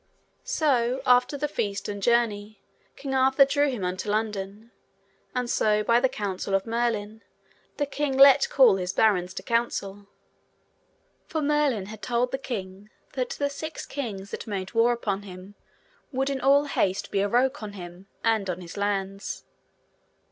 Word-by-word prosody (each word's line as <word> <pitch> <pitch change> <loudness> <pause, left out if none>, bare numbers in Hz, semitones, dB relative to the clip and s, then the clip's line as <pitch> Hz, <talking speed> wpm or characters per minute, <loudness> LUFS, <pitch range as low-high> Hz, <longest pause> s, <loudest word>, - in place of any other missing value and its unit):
So 260 - +1
after 250 +2 +4
the 295 +1 -1
feast 200 -8 -3
and 205 -1 -5
journey, 215 -2 +1 0.4
King 275 -2 -5
Arthur 265 +1 +5
drew 285 +1 +2
him 230 -8 -3
unto 185 +3 -3
London, 210 +1 -3 0.6
and 250 -1 -1
so 215 -2 +2
by 235 +2 +4
the 260 +1 +2
counsel 195 -2 -2
of 195 - 0
Merlin, 225 -2 -2 0.6
the 290 - +1
king 285 -1 -2
let 275 0 +7
call 245 -8 +5
his 180 0 -3
barons 185 -4 +2
to - - -6
council, 205 -4 -2 1.2
for 320 - -2
Merlin 285 -8 +1
had 215 +1 -10
told 245 0 0
the 265 - -2
king 200 -5 -6 0.2
that 255 -2 -2
the 285 - -1
six 315 +3 -6
kings 205 -8 -6
that - - -6
made 195 -2 -4
war 230 +1 +4
upon 205 -4 -2
him 190 0 -11 0.6
would 270 +1 -1
in 270 -1 -3
all 280 +2 +4
haste 195 -9 -1
be 195 - +1
awroke 250 +6 +1
on 210 -1 -6
him 180 0 -10 0.2
and 220 -4 +1
on 180 0 -3
his 175 0 -10
lands. 195 -1 -2
225 Hz, 160 wpm, -26 LUFS, 200-265 Hz, 1.2 s, let